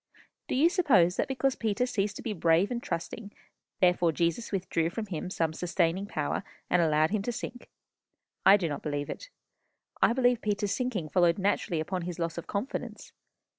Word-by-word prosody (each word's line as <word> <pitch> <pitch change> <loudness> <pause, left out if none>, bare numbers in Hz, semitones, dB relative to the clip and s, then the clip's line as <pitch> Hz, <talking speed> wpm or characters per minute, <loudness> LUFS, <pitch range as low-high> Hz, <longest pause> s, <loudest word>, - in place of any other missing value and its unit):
Do - - -1
you 290 +6 +5
suppose 270 - +4
that - - +1
because 265 0 0
Peter 225 +2 0
ceased 205 -4 -1
to - - -8
be 225 -4 -2
brave 170 +2 +2
and 240 -1 -2
trusting, 205 +4 -5 0.5
therefore 180 -2 +4
Jesus 170 +7 -1
withdrew 175 -4 0
from 215 +5 -4
him 180 -2 -5
some 165 -4 -1
sustaining 180 +2 0
power, 150 -7 -2 0.3
and 180 - +4
allowed 155 0 +3
him 215 -1 0
to 240 - -2
sink? 240 +1 -7 0.7
I 195 +2 +8
do 180 -4 -1
not 145 - -4
believe 145 -1 -3
it. - - -8 0.7
I - - +5
believe 245 -1 +2
Peter's 205 -1 -1
sinking 225 -11 -2
followed 175 -1 +3
naturally 195 -3 0
upon 180 +4 -2
his 175 0 -5
loss 170 -1 -2
of - - -10
confidence. 205 +7 -5
190 Hz, 180 wpm, -29 LUFS, 170-230 Hz, 0.7 s, I